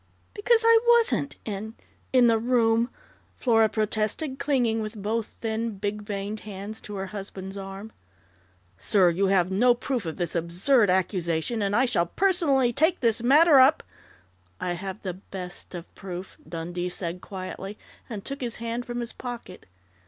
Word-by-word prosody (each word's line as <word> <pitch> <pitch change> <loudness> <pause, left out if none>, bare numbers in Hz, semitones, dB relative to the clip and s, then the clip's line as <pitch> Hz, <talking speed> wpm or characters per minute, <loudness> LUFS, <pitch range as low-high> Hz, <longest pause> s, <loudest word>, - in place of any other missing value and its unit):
"Because 450 +2 +3
I 455 0 +7 0.2
wasn't 460 - +1
in 215 +1 -5 0.4
in 255 -2 +5
the 230 -1 +4
room," 230 0 +2 0.5
Flora 225 -3 +3
protested, 220 +7 -1
clinging 240 -6 +1
with 215 +1 -5
both 215 +2 -1
thin, 225 -1 -4
big 205 +1 -3
veined 205 0 -4
hands 205 +1 -7
to 210 - -8
her 190 0 -3
husband's 195 -1 -7
arm. 195 +2 -7 0.9
"Sir, 185 -4 +4
you 195 +4 +1
have 190 -1 +2
no 240 +6 +4
proof 245 -6 -3
of 160 - -5
this 175 -3 -2
absurd 180 +8 +2
accusation, 180 +2 0
and 200 0 0
I 260 - +4
shall 175 -9 +1
personally 290 - +2
take 320 +7 +2
this 230 -2 +2
matter 290 +4 +6
up 270 +4 +5 0.4
" - - -36 0.3
"I 175 - -1
have 190 +3 -6
the 185 -3 -3
best 180 -1 -8
of 175 0 -9
proof," 185 0 -8
Dundee 175 +2 -4
said 180 0 -3
quietly, 195 +1 -7 0.3
and 210 -4 -6
took 275 0 -5
his 235 -3 -2
hand 235 +1 -4
from 240 0 -3
his 235 - -4
pocket. 240 -7 -8
215 Hz, 160 wpm, -26 LUFS, 190-245 Hz, 0.9 s, I